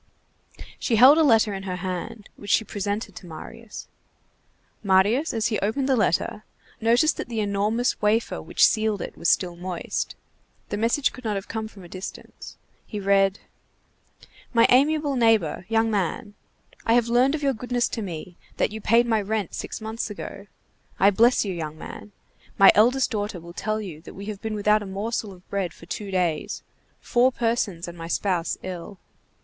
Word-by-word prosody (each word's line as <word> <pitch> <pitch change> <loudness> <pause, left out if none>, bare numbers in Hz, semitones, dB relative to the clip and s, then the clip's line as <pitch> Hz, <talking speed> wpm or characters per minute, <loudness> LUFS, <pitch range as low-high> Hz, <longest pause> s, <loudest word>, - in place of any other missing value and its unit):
She 235 - +1
held 265 +8 +8
a - - +5
letter 225 -6 +4
in 195 - -4
her 190 -2 -4
hand, 185 +3 -5
which 205 - -10
she 220 - +4
presented 205 +2 -3
to 180 - -10
Marius. 210 +7 -9 0.9
Marius, 205 +9 +3
as 225 -2 -1
he 215 - 0
opened 240 +7 -1
the 270 - +3
letter, 210 0 0 0.4
noticed 240 +8 +3
that - - -5
the 230 -2 -2
enormous 210 +4 0
wafer 215 +2 +1
which - - +3
sealed 215 -3 +1
it - - -8
was 170 - 0
still 175 -2 +2
moist. 180 0 -4 0.5
The 205 - -2
message 235 +5 +1
could 255 - -11
not 215 -2 -1
have 195 - -4
come 220 -1 -4
from 200 -3 -14
a - - -11
distance. 185 +2 -9 0.3
He 210 - -5
read:— 195 0 +3 1.2
MY 230 - +6
AMIABLE 285 +2 +3
NEIGHBOR, 225 -8 +2
YOUNG 225 0 +2
MAN: 205 +1 -2 0.5
I 230 - +2
have 240 -1 +3
learned 250 +5 +3
of 300 - -5
your 275 -1 +2
goodness 245 +1 -1
to 225 - -4
me, 175 -2 -7 0.2
that - - +1
you 220 +1 -6
paid 230 +3 +4
my 225 -2 +1
rent 205 -2 -2
six - - -5
months 220 +1 -4
ago. 200 -1 -8 0.5
I 195 +2 +6
bless 235 +4 +4
you, 195 - -2
young 155 -3 -5
man. 210 - -9 0.5
My 195 - +9
eldest 250 +5 +3
daughter 205 -4 -3
will 170 +1 -11
tell 215 +4 -2
you 175 -7 -7
that - - -12
we 200 - -8
have 210 -2 -6
been 220 -1 -3
without 210 +1 +3
a 205 - -6
morsel 205 +2 -3
of 185 -1 -16
bread 190 -4 -2
for - - -14
two 200 +3 -5
days, 175 -5 -1 0.4
four 245 +2 +3
persons 225 -8 -1
and 175 - -8
my 165 -1 -7
spouse 180 -1 -1
ill. 185 +1 -7
210 Hz, 185 wpm, -24 LUFS, 190-230 Hz, 1.2 s, My